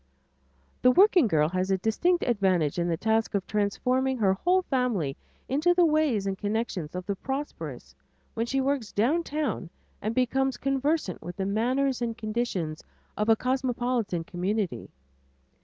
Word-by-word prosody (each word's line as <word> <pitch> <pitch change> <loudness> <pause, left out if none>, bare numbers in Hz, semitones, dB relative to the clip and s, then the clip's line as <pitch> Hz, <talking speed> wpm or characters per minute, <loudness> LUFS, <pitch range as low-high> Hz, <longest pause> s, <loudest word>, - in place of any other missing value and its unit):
The 250 - +6
working 360 - +5
girl 150 -6 +3
has 185 +1 -1
a 190 - +2
distinct 330 - +1
advantage 185 - +1
in 170 - 0
the 165 -1 0
task 220 +2 0
of 195 - 0
transforming 255 +6 0
her 195 -4 +3
whole 365 - +2
family 235 - 0 0.3
into 310 +6 +2
the 350 -1 +5
ways 305 -10 +2
and 195 -1 -1
connections 205 -6 -3
of 180 0 -4
the 200 - -2
prosperous 270 +8 -5 0.4
when 230 +1 -2
she 270 +2 0
works 265 -6 -1
down 265 +12 +2
town 295 - -3 0.3
and 215 +2 -2
becomes 265 +1 +1
conversant 275 - -1
with 175 +2 -7
the 195 - -2
manners 250 +6 0
and 230 -1 -2
conditions 215 -9 -3 0.3
of 210 +1 -1
a 225 - +7
cosmopolitan 245 -7 -1
community. 180 - -2
225 Hz, 155 wpm, -27 LUFS, 190-270 Hz, 0.4 s, a